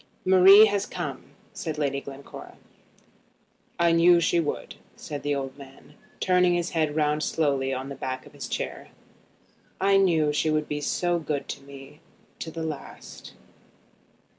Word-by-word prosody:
"Marie 190 +3 +8
has 205 -2 -1
come," - - -6 0.3
said 160 -3 -5
Lady 140 -2 -1
Glencora. 140 0 -11 1.2
"I 170 0 +3
knew 170 +1 +5
she 170 0 +2
would 155 -3 -3
come," - - -13 0.2
said 145 -1 -7
the 145 0 -1
old 135 -1 -5
man, 135 +1 -14 0.3
turning 180 -1 +3
his 175 0 -2
head 155 -3 0
round 150 -1 +1
slowly 140 -4 0
on 130 +1 -4
the - - -5
back 130 -1 -5
of - - -16
his - - -7
chair. - - -5 0.9
"I 195 0 +4
knew 160 -6 +2
she 155 +2 0
would 155 -1 0
be 150 0 -3 0.4
good 145 -2 -3
to 140 - -6
me 140 +1 -13 0.4
to 165 - -5
the 165 0 -6
last." 155 -3 -8
155 Hz, 155 wpm, -26 LUFS, 140-170 Hz, 1.2 s, Marie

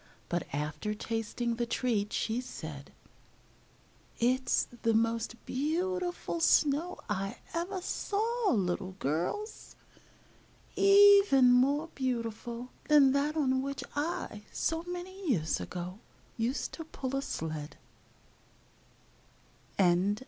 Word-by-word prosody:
But 175 -1 -1
after 150 +9 -3
tasting 230 +2 -2
the 240 0 -1
treat, 225 -4 0
she 230 +2 -1
said: 155 - -8 1.3
"It's 255 +2 +2
the 225 -1 +2
most 230 +1 +1
beautiful 350 +5 -1
snow 320 +2 +3
I 195 -1 -2 0.2
ever 355 +3 -3
saw, 445 +3 0
little 185 - 0
girls, 180 - -3 1.0
even 395 -10 +7
more 280 +6 +3
beautiful 240 -1 -3 0.2
than 290 -3 +6
that 290 +3 0
on 260 -3 +2
which 275 0 -4
I, 290 -8 -3
so 325 0 -1
many 360 +1 -5
years 160 - +1
ago, 180 +2 -6 0.4
used 240 +4 -2
to 325 - -6
pull 270 -4 -4
a 275 - 0
sled." 155 - -5
255 Hz, 100 wpm, -31 LUFS, 215-330 Hz, 1.3 s, even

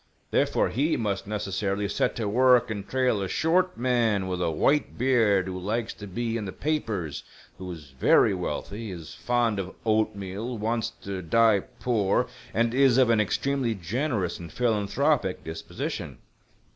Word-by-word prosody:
Therefore, - - +2
he 150 +7 +1
must 100 -3 -2
necessarily 100 -1 -2
set 100 - 0
to 110 -3 -2
work 125 +2 +4
and 100 -2 -5
trail 130 -5 +1
a 95 - -1
short 180 - +1
man 115 -5 +1
with 90 -1 -2
a 85 - +1
white 140 - +1
beard 115 -7 +3
who 95 -1 -5
likes 110 +5 -2
to 105 - -9
be 115 +4 -2
in 110 - -4
the 95 - -4
papers, 105 - -2 0.4
who 90 -1 -6
is 75 -5 -10
very 65 - +4
wealthy, 110 +2 -4
is 80 -4 -8
fond 120 -4 0
'of 95 -1 -5
oatmeal, 110 +1 -1
wants 115 +2 -1
to 95 -1 -4
die 110 +5 +4 0.2
poor, 105 -6 +1 0.3
and 115 +2 +1
is 130 -2 +4
of 130 -3 +5
an 110 -2 +4
extremely 130 +3 0
generous 105 - -2
and 85 -2 -9
philanthropic 110 -5 +1
disposition. 80 0 -5
110 Hz, 160 wpm, -26 LUFS, 95-120 Hz, 0.4 s, of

